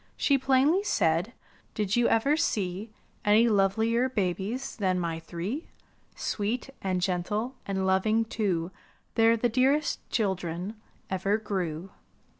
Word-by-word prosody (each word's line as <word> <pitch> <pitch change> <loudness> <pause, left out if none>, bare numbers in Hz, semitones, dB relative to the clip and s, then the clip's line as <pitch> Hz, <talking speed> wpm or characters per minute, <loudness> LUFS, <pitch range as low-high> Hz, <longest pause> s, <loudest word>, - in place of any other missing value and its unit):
She 280 - +3
plainly 275 +7 +3
said, 170 - +1 0.4
''Did 210 -2 0
you 240 0 +3
ever 275 +7 +3
see 200 - -1 0.3
Any 215 +3 +5
lovelier 225 +4 +2
babies 205 +3 -2
than 185 -4 +1
my 165 -2 -2
three? 180 - -5 0.5
Sweet, 230 +6 -2
and 185 -1 0
gentle, 205 +7 -1
and 190 -1 -1
loving, 215 +4 +2
too, 190 -6 -1 0.4
TheyTe 225 0 +4
the 240 - +3
dearest 270 +6 +2
children 185 -2 -1 0.4
ever 195 +2 +1
grew! 190 -5 -3
210 Hz, 120 wpm, -28 LUFS, 185-235 Hz, 0.5 s, Any